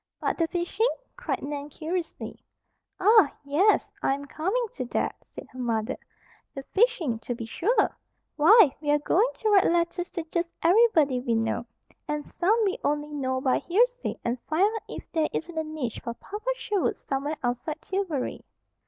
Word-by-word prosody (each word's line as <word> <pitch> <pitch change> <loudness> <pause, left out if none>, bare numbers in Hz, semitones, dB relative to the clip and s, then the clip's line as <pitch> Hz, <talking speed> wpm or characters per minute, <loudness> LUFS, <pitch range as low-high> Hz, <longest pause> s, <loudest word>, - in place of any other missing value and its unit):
"But - - -1
the 330 - +2
fishing?" 360 +7 0 0.3
cried - - -3
Nan 285 +1 -4
curiously. 330 +3 -5 0.6
"Ah, 420 -5 +6
yes. 355 +10 +3
I 270 - +2
am 280 +1 -8
coming 380 - -1
to - - -5
that," - - -1
said - - -11
her 255 - -11
mother. 225 -3 -1 0.6
"The 275 - -5
fishing, 380 - +2
to 240 +1 -4
be 230 -1 -6
sure! 400 - +1 0.4
Why, 325 - +7
we 295 - -3
are 295 - +5
going 360 +9 +2
to 435 - -1
write 395 -2 +6
letters 345 +1 +1
to 340 - -3
just 340 -1 -2
everybody 330 - +4
we 240 -2 0
know, 225 +1 -1 0.4
and 300 0 -2
some 395 +7 +1
we 390 - -1
only 295 +1 -1
know 260 -2 -1
by 260 -1 +2
hearsay, - - +1
and 240 +1 -1
find 315 +4 +2
out 445 - -3
if - - -6
there 320 -2 +1
isn't 340 +1 -4
a 320 - 0
niche 310 -7 -4
for 235 - -4
Papa 425 - -6
Sherwood 420 -5 -1
somewhere 285 +3 -3
outside 250 +6 -2
Tillbury." 375 -8 -2
320 Hz, 170 wpm, -27 LUFS, 275-390 Hz, 0.6 s, Why